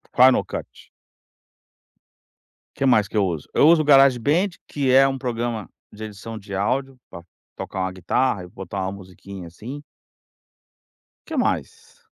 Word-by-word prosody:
Final 130 +1 +6
Cut. - - -8 1.9
Que 135 - 0
mais 110 -6 +4
que - - -7
eu 100 -2 +3
uso, 80 -5 -4
eu - - +4
uso 165 -2 +5
Garage 135 -3 +6
Band, 160 - +1 0.2
que 140 -3 -1
é 135 +1 +7
um 135 0 -2
programa 120 -4 -3 0.2
de 110 +1 -8
edição 110 +1 -8
de 100 -1 -9
áudio 130 +7 -1
pra 85 -2 -10 0.3
tocar 95 - -5
uma 95 0 -1
guitarra 95 +3 0
e - - -11
botar 95 +2 -7
uma 95 +1 -2
musiquinha 95 -1 -10
assim. 125 - -9 1.5
Que - - -5
mais? - - -3
110 Hz, 150 wpm, -22 LUFS, 95-135 Hz, 1.9 s, é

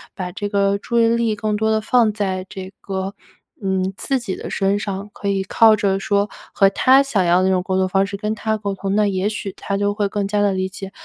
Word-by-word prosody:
把 180 -2 -4
这 205 +3 -4
个 200 -1 +2
注 235 +3 -1
意 230 - +4
力 230 -1 +1
更 210 0 -1
多 220 +1 0
地 220 0 +1
放 225 0 +3
在 190 -3 -2
这 190 -2 -8
个， 190 0 -4 0.5
嗯， 190 -1 -1
自 270 -1 -1
己 220 -6 -4
的 - - -7
身 195 +1 0
上， 200 0 -5
可 200 - -6
以 195 -1 +1
靠 220 +3 +5
着 195 -2 0
说 200 +1 0 0.2
和 195 -1 +5
他 265 +6 +5
想 230 -9 0
要 175 +1 +4
的 185 - +2
那 - - +3
种 185 - +1
沟 185 0 -1
通 190 0 +2
方 195 +1 +2
式 200 - -5
跟 210 +1 -2
他 220 0 -1
沟 200 -2 -3
通， 195 0 -2
那 210 0 +3
也 190 0 0
许 205 -2 -5
他 200 - -3
就 205 0 0
会 205 -1 0
更 205 0 -2
加 205 +1 0
地 200 -1 +2
理 190 0 -1
解 195 0 -8
200 Hz, 270 characters per minute, -20 LUFS, 190-215 Hz, 0.5 s, 靠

